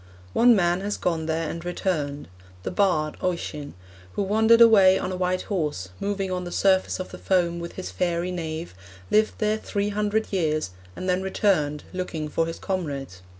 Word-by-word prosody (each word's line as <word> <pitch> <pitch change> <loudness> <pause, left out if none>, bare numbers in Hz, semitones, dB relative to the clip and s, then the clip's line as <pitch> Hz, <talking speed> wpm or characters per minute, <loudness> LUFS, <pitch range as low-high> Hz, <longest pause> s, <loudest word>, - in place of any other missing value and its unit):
'One 240 0 +6
man 175 -1 +2
has 205 +1 -2
gone 165 -3 -1
there 160 0 -1
and 165 +2 -5
returned. 160 -5 -2 0.4
The - - -3
bard, 155 -7 +1
Oisen, 150 -5 -3 0.4
who - - -1
wandered 220 +3 +4
away 200 -5 +7
on 185 - -3
a - - -2
white 180 0 0
horse, 150 - -2
moving 200 -2 -2
on 180 0 -2
the 175 - -6
surface 190 0 +2
of 185 - -5
the - - -9
foam 175 -2 +1
with 170 0 -6
his 185 - -6
fairy 175 0 -1
Niamh 165 -2 -4 0.4
lived 215 +1 +3
there 215 0 +1
three 205 -1 -2
hundred 210 +1 -1
years, 155 - 0 0.2
and 185 - -5
then 180 0 +1
returned 175 -7 +1
looking 165 -4 -3
for 165 +2 0
his 165 - -5
comrades. 140 - -4
180 Hz, 180 wpm, -25 LUFS, 160-195 Hz, 0.4 s, away